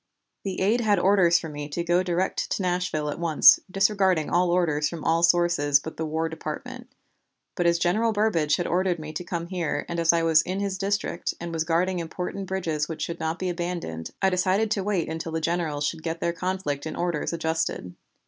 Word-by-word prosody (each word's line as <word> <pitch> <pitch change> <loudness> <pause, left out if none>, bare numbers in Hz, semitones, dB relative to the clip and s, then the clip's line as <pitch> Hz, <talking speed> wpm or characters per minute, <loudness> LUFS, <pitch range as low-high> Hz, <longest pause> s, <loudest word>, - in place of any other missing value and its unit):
The 190 -2 -3
aide 220 +6 +2
had 210 -3 +3
orders 185 -2 +4
for 165 - -5
me 145 -1 -6
to 170 +4 -3
go 175 +1 +2
direct 185 +1 -1
to 195 - -2
Nashville 175 -4 -1
at - - -6
once, 165 -3 +6
disregarding 195 -4 +2
all 175 0 +3
orders 160 -4 +1
from 170 -3 -7
all 165 +1 +2
sources 170 -4 +3
but 160 +2 -8
the 160 - -2
War 160 +1 -1
Department; 240 +11 -7 0.6
but 175 -2 0
as 170 0 +3
General 215 +7 +1
Burbridge 190 -9 +2
had 175 - -2
ordered 180 0 +1
me 155 -1 -8
to 180 - -4
come 170 -1 -4
here, 170 -6 -2
and 170 0 -3
as 165 -1 +4
I 170 -1 +1
was 160 -1 +5
in 185 +4 -4
his 200 -2 -2
district, 200 -3 -2
and 170 0 -6
was 160 -1 -1
guarding 175 +2 +1
important 180 +3 -5
bridges 165 -5 -2
which 160 - -4
should 170 0 -4
not 160 +1 -2
be 185 - -3
abandoned, 170 - -4
I 190 - +4
decided 190 +4 +1
to 200 -3 0
wait 190 -4 0
until 160 0 -5
the 160 - 0
generals 160 -3 -1
should 160 +1 -3
get 165 0 -4
their 170 - -1
conflict 170 -5 -3
in - - -5
orders 175 -3 -1
adjusted. 160 - -2
170 Hz, 210 wpm, -25 LUFS, 160-185 Hz, 0.6 s, once